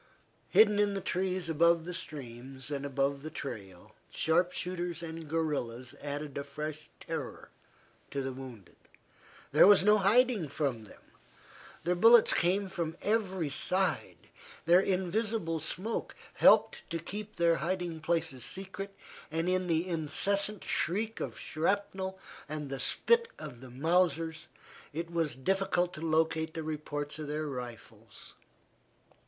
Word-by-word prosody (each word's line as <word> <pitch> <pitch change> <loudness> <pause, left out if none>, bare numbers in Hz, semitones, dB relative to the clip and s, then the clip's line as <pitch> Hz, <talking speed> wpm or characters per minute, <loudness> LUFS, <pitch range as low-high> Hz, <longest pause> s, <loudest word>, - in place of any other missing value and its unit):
Hidden 210 -1 +6
in 205 -1 +2
the - - -1
trees 185 -1 -1
above 165 +1 +3
the 180 - -5
streams, 135 -4 -7
and 140 0 -2
above 140 0 0
the 155 - -6
trail, 100 - -8 0.2
sharp 175 +3 +2
shooters 175 -2 -3
and 160 -1 -7
guerillas 135 -7 -2
added 145 0 -5
a - - -3
fresh 150 +2 -6
terror - - -6 0.6
to 140 -1 -3
the 135 0 -3
wounded. 125 -7 -11 0.7
There - - +7
was 205 -2 +7
no 210 +1 +5
hiding 215 -2 +3
from 135 -7 -2
them. - - -16 0.8
Their 175 +2 +2
bullets 225 +5 +7
came 190 +3 +2
from 170 -4 -4
every 190 -8 0
side. 180 +2 +1 0.5
Their 175 +3 +7
invisible 190 -2 0
smoke 185 +8 -4 0.2
helped - - +5
to 165 - -2
keep 205 +6 -7
their 170 -1 +3
hiding 175 0 -2
places 160 -5 -1
secret, 195 +1 -5 0.3
and 165 +2 -1
in 185 0 +1
the 165 +1 +1
incessant 195 +5 +2
shriek 215 +5 0
of - - -5
shrapnel 190 +3 -1 0.3
and 150 -2 -5
the 135 - -3
spit 470 - +3
of 120 -1 -9
the 130 - -10
Mausers, 165 +3 +1 0.5
it 165 +2 -4
was 165 -6 0
difficult 180 +4 0
to 155 - -8
locate 160 0 +1
the 160 - -3
reports 150 -1 -4
of 155 - -5
their 150 +1 -2
rifles. 120 -5 -8
165 Hz, 135 wpm, -31 LUFS, 145-185 Hz, 0.8 s, There